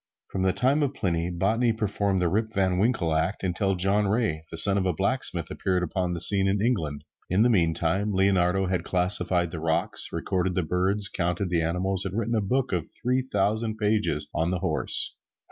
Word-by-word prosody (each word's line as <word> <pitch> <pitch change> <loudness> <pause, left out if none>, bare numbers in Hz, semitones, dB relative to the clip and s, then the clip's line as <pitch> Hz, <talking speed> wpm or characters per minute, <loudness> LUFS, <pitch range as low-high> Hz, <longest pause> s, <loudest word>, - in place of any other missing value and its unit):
From 95 - -3
the 95 0 +2
time 135 +8 +1
of 140 -1 -1
Pliny, 85 -2 -1
botany 110 +7 +1
performed 105 -2 -1
the 90 - +1
Rip 110 +5 -1
Van 95 -2 +1
Winkle 100 -7 +1
act 85 +7 -1
until 95 +2 0
John 100 +3 +1
Ray, 105 -7 0
the 80 - -7
son 95 +5 +7
of 95 - -1
a 90 - +1
blacksmith, - - -1
appeared 90 -1 -1
upon 90 +1 -2
the 85 - -4
scene 95 +1 +4
in 100 +1 +1
England. 85 -11 -1 0.3
In 95 +5 +3
the 120 - +3
meantime, 90 +2 +1
Leonardo 95 -1 +2
had 90 -2 -1
classified 90 -2 +1
the 85 - -5
rocks, 80 0 -1
recorded 90 -1 -2
the 90 - 0
birds, 95 +5 0
counted 90 +1 -2
the 85 -2 +1
animals 90 +3 -1
and 95 +1 -4
written 115 +1 -1
a 110 - +1
book 125 +6 -1
of 85 -3 -2
three 125 +1 -1
thousand 110 -1 -1
pages 105 -8 0
on 80 +2 0
the 90 - -1
horse. - - 0
95 Hz, 195 wpm, -26 LUFS, 90-105 Hz, 0.3 s, son